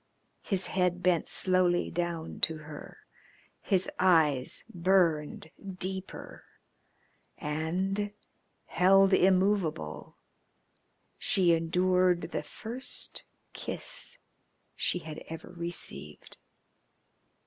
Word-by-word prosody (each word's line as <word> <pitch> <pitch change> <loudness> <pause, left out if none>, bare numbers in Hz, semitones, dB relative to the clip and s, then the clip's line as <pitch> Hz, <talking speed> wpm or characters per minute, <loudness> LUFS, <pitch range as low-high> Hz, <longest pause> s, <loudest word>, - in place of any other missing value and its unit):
His 195 -3 -1
head 180 -1 0
bent 180 -2 +2
slowly 185 -1 +3
down 170 -1 -3
to 160 -1 +1
her, 150 -1 -11 0.6
his 190 -2 +1
eyes 160 -8 +3
burned 170 -4 +1 0.3
deeper, 190 +1 -4 0.9
and, 180 +7 -2 0.5
held 195 +2 +4
immovable, 185 - +1 1.0
she 180 -3 +4
endured 180 +2 +2
the - - -2
first 240 +4 -5 0.3
kiss - - -3 0.6
she - - 0
had 160 -2 -7
ever 165 +1 -8
received. 170 - -5
180 Hz, 80 wpm, -29 LUFS, 160-190 Hz, 1.0 s, held